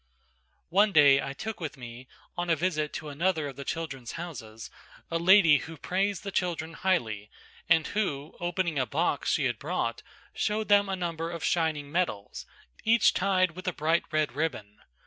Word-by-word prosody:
One 205 +4 +4
day 145 -5 +6
I 135 - -4
took 220 +9 -6
with 155 -4 -5
me 120 0 -10 0.3
on 175 0 -3
a 165 - +4
visit 155 -2 -1
to 155 0 -5
another 155 +1 0
of 140 - -8
the 140 - -7
"Children's 140 -7 -5
Houses" 115 -11 -8 0.4
a 165 - 0
lady 170 -4 +6
who 160 0 -9
praised 195 +5 -1
the 200 - -4
children 165 -3 -2
highly 115 - -1 0.4
and 160 -3 +5
who, 155 -9 -2
opening 175 -3 -1
a 130 - 0
box - - 0
she - - +2
had - - -1
brought, - - -2 0.3
showed 215 +1 -1
them 205 -1 +5
a 190 - 0
number 165 -2 -3
of 170 -1 -6
shining 155 -4 0
medals, 150 - -2 0.4
each 225 0 +4
tied 185 -2 +2
with 185 +3 -10
a 180 - 0
bright 160 +3 +1
red 155 -3 0
ribbon. 120 -10 -3
165 Hz, 175 wpm, -28 LUFS, 145-185 Hz, 0.4 s, day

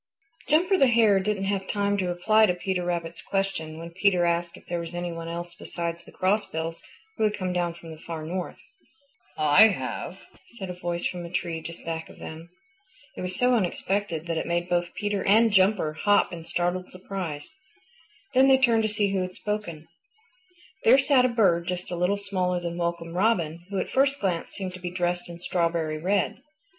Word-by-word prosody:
Jumper 355 +6 +4
the 270 - +6
Hare 225 -5 +5
didn't 195 0 -1
have 195 -1 -1
time 205 -1 0
to 185 -2 0
reply 215 +5 +4
to 180 - +1
Peter 180 0 -2
Rabbit's 170 -1 -3
question 195 -5 -2
when 165 +1 -8
Peter 185 0 +3
asked 170 0 0
if - - -17
there 175 0 -2
was 170 +1 -6
any 175 0 -3
one 165 0 -6
else 170 +1 -5
besides 170 -1 -5
the - - -14
Crossbills 175 -4 -1 0.4
who - - 0
had 210 0 +1
come 185 -2 -2
down 175 -1 -1
from 165 -1 -11
the 160 - -10
Far 160 -1 -6
North. 180 +2 -4 0.8
"I 155 +8 +7
have," 205 - -4 0.4
said 190 -4 -5
a - - -5
voice 175 -1 -3
from 180 -1 -2
a 170 - -7
tree 170 -2 -2
just 170 +1 -9
back 165 0 -4
of - - -14
them. 160 +2 -9 0.7
It - - -6
was 185 0 -3
so 250 +4 +3
unexpected 190 -4 -1
that 165 -1 -1
it - - -4
made 175 0 0
both 175 0 0
Peter 205 -2 -1
and 225 +3 +5
Jumper 190 -5 +3
hop 205 +4 +2
in 165 -1 -7
startled 175 +2 -1
surprise. 180 - -6 0.8
Then 265 +1 +6
they 265 -1 +7
turned 235 -4 +4
to 220 - +1
see 205 -1 +1
who 190 - +1
had 185 0 -4
spoken. 190 -7 -4 1.0
There 245 +4 +7
sat 270 -2 +4
a - - +3
bird 185 -8 +2
just 180 0 -3
a - - -1
little 180 +4 +1
smaller 185 -3 -1
than 170 -1 -4
Welcome 170 -1 -3
Robin, 175 -5 +1
who 200 - -3
at - - -2
first 275 +1 +3
glance 180 -4 -1
seemed 185 -2 -5
to 185 - -9
be 180 -1 -4
dressed 175 0 -2
in 170 - -8
strawberry 170 -3 -1
red. 195 +7 0
180 Hz, 200 wpm, -26 LUFS, 170-205 Hz, 1.0 s, I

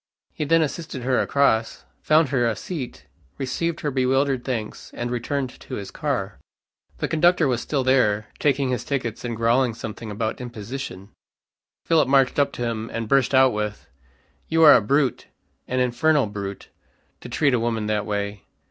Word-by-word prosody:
He 150 - -3
then 165 +2 +4
assisted 150 -4 -5
her 130 0 +2
across, 115 -5 +1 0.2
found 155 -1 +3
her 125 -3 +2
a 115 - 0
seat, 120 - -6 0.3
received 165 +6 -2
her 145 - -1
bewildered 135 0 +1
thanks, 115 -5 -4
and 120 0 -3
returned 130 +2 -2
to 130 - -7
his 100 -4 -6
car. - - -3 0.6
The - - -2
conductor 170 0 +3
was 120 -2 0
still 140 -3 -1
there, 115 -5 +2
taking 140 -2 +1
his 125 - -1
tickets, 125 -5 -3
and 120 -1 -3
growling 115 +1 +2
something 110 0 -7
about 110 +3 -3
imposition. 115 -4 -7 0.8
Philip 165 -5 +3
marched 135 0 +3
up 140 - +3
to 120 - -4
him, 115 -1 -3
and 115 -1 -3
burst 135 +1 +3
out 130 -1 +5
with, 105 0 -4 0.6
"You 165 0 +3
are 150 -2 +10
a - - +6
brute, 135 +3 0 0.4
an 130 - -1
infernal 135 +3 +2
brute, 100 -1 -6 0.5
to - - -10
treat 145 -4 +2
a 125 - +3
woman 115 -2 -1
that 105 0 -1
way." 100 -1 -3
125 Hz, 170 wpm, -23 LUFS, 110-140 Hz, 0.8 s, are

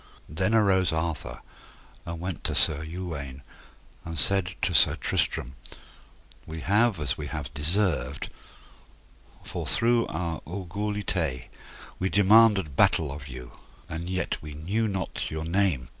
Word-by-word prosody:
Then 95 +8 0
arose 95 -6 +4
Arthur 80 -1 -3 0.7
and 85 0 -4
went 90 +1 -4
to - - +1
Sir 75 0 +3
Uwaine, 80 -6 -6 0.6
and 80 -1 -6
said 90 +4 +1
to - - +2
Sir - - +5
Tristram: 60 - -1 0.9
We 80 0 -6
have 105 0 +3
as 75 0 -2
we 75 - -4
have 75 -4 -5
deserved, 75 -3 0 1.1
for - - -5
through 120 0 +3
our 85 -2 -3
orgulyté 90 -6 -3 0.5
we 95 - 0
demanded 100 -6 +5
battle 75 0 +4
of 70 0 -7
you, 65 -2 -9 0.4
and 85 +1 -5
yet 95 0 -2
we 75 -1 -8
knew 100 +9 0
not 95 -3 -2
your 80 0 -4
name. 85 -8 +1
85 Hz, 130 wpm, -27 LUFS, 75-100 Hz, 1.1 s, Sir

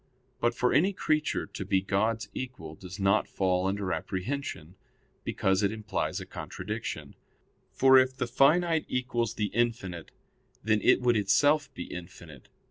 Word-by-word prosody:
But 120 0 +1
for 125 +1 +1
any 180 +9 +3
creature 155 -4 0
to - - -7
be 95 - +2
God's 105 +4 0
equal 120 -12 -6
does 90 +3 -10
not 100 +2 +2
fall 95 -1 0
under 95 -1 -1
apprehension, 95 - -4 0.5
because 95 +1 +1
it 100 0 +2
implies 110 -2 -3
a - - -7
contradiction; - - -6 0.6
for 130 0 +6
it 130 0 +1
the - - -1
finite 160 +6 +3
equals 120 -3 -1
the 105 -2 -2
infinite, 110 -8 -1 0.5
then 110 -1 +2
it - - +4
would 120 -1 +3
itself 145 +9 +3
be 90 - -5
infinite. 85 -6 -10
110 Hz, 145 wpm, -29 LUFS, 95-130 Hz, 0.6 s, for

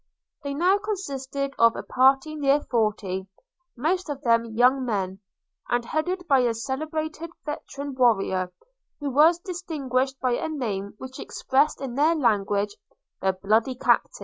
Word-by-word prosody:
They 280 0 -3 0.3
consisted 275 -9 -3
of 230 0 +6
a - - -5
party 270 +4 +3
of 310 - -7
near 285 0 +3
forty, 205 -5 -1 0.5
most 335 +7 0
of 285 0 -5
them 230 -2 +3
young 250 +4 +3
men; 195 -5 -2 0.5
and 240 0 +1
headed 355 +6 -2
by 275 -3 +5
a 240 -2 +2
celebrated 310 +6 -4 0.2
veteran 285 -2 -5
warrior, 195 -7 +2 0.5
who 290 -2 -3
was 310 +6 +5
distinguished 285 -8 -2
by 255 - +1
a 240 - -1
name 210 -10 -3
which 260 +2 -9
expressed, 280 +3 0
in 265 -3 -4
their 305 +6 +3
language, 205 -6 +1 0.5
'The 190 0 +2
bloody 220 +5 +2
Captain!' - - +2
265 Hz, 145 wpm, -25 LUFS, 230-300 Hz, 0.5 s, of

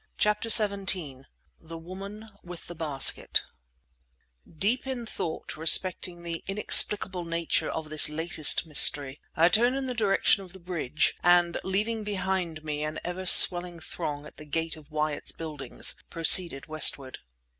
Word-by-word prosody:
CHAPTER 210 +2 -2
XVII 190 - +1 0.3
THE 165 0 -12
WOMAN 195 +6 -11
WITH 175 -1 -12
THE 175 - -10
BASKET 150 -5 0 1.1
Deep 235 - -2
in 255 -3 -6
thought 165 -7 -7
respecting 175 +2 0
the 170 -1 -7
inexplicable 195 -2 +2
nature 170 0 -3
of 155 -1 -7
this 155 -1 +4
latest 160 +1 0
mystery, 145 -2 +4
I 165 +1 +3
turned 240 +7 +2
in 270 0 -5
the 255 - -5
direction 205 -3 0
of 185 -1 -15
the 190 - -14
bridge, 170 -4 -3
and 175 -1 +1
leaving 215 +4 -3
behind 190 -5 -5
me 150 -1 -5
an 155 0 -6
ever 180 +1 -7
swelling 175 -1 +7
throng 150 -3 -8
at - - -16
the 150 - -13
gate 160 +2 -5
of 155 -2 -18
Wyatt's 150 -1 -4
Buildings, 155 -4 -3 0.2
proceeded 165 -3 +4
westward. 150 -4 0
170 Hz, 145 wpm, -25 LUFS, 155-195 Hz, 1.1 s, swelling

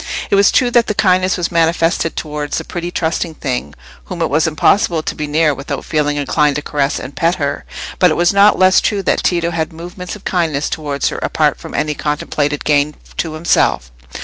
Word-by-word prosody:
It - - +4
was 200 0 +5
true 245 -1 +2
that 240 -1 +3
the 210 - -1
kindness 185 -1 +2
was 175 - -2
manifested 165 0 +1
towards 150 -1 -3
a - - -6
pretty 175 0 -5
trusting 165 -1 -2
thing 125 - -4 0.3
whom 180 - -7
it 160 - -1
was 155 +3 +2
impossible 165 +1 +2
to - - -3
be 150 - -4
near 150 0 +2
without 140 +1 -6
feeling 150 -2 0
inclined 145 +1 +1
to 150 - -3
caress 145 -2 -1
and 135 - -8
pet 170 +2 +1
her; 140 -3 -3 0.3
but 180 - +5
it 155 - 0
was 175 +2 +3
not 200 +1 +5
less 185 0 +5
true 200 -2 -1
that - - +1
Tito 170 -1 +1
had 160 -2 -2
movements 175 +3 -8
of 210 - -14
kindness 160 -5 0
towards 145 -3 -2
her - - -5
apart - - 0
from - - -9
any 150 0 0
contemplated 145 -1 -2
gain 150 0 +2 0.2
to 160 -2 -2
himself. 65 - +1
160 Hz, 205 wpm, -16 LUFS, 150-180 Hz, 0.3 s, was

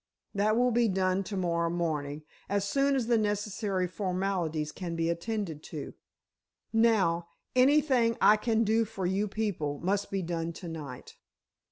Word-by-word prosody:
"That 215 +2 +2
will 250 +1 +3
be 235 0 +3
done 190 -1 +1
to 200 +1 -4
morrow 170 -2 0
morning—as 160 +4 -3
soon 275 +5 +2
as 255 -3 0
the 235 -1 +3
necessary 205 -2 -1
formalities 180 -5 -2
can 170 -1 -5
be 165 0 +1
attended 170 -3 -3
to. - - -6 0.8
Now, 195 -7 +3 0.3
anything 255 -3 +4
I 210 - +7
can 225 +1 +1
do 225 +1 +3
for 195 -3 -5
you 195 +4 +1
people, 190 -9 -2
must 200 +2 0
be 195 -1 -2
done 170 0 -3
to 175 +2 -8
night." 150 -6 -8
195 Hz, 150 wpm, -29 LUFS, 170-220 Hz, 0.8 s, I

